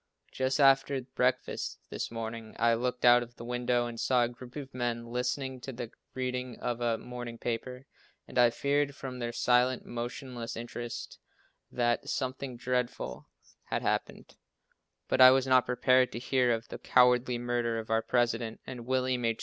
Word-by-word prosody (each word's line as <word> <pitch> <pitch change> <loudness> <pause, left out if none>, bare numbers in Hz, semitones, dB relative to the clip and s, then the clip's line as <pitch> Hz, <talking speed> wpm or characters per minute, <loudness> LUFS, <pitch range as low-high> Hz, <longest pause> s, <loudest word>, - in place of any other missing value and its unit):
Just 130 +2 0
after 135 0 +5
breakfast 125 0 -1
this - - -3
morning, 115 -1 -6
I 115 +1 +4
looked 125 +2 -1
out 120 0 +8
of 120 0 -9
the 115 - -9
window 120 0 0
and 120 -1 -6
saw 125 -2 +3
a - - +2
group 120 +1 -12
of 140 -2 -7
men 120 -2 -2
listening 125 +2 -3
to 135 - -6
the 120 -2 -6 0.2
reading 125 -1 -3
of 120 0 -3
a 115 -1 +1
morning 120 0 -7
paper, 125 +3 -4 0.4
and - - -2
I 120 -1 +7
feared 140 +3 0
from 130 -2 -7
their 120 -1 -2
silent, 125 +1 +2
motionless 120 0 -5
interest 120 0 -6 0.5
that 120 -1 0
something 130 -1 -3
dreadful 125 0 -2 0.4
had - - -2
happened, - - -2 0.7
but 130 - +2
I 130 - +12
was 130 0 +4
not 130 -1 +4
prepared 130 0 +3
to - - -4
hear 125 -1 +2
of 115 0 -2
the - - -7
cowardly 125 0 +4
murder 120 -1 -1
of 110 0 -5
our 110 0 +3
President. 115 -1 0
And 125 -2 -8
William 130 -1 +1
H. 115 -1 0
125 Hz, 170 wpm, -30 LUFS, 120-130 Hz, 0.7 s, I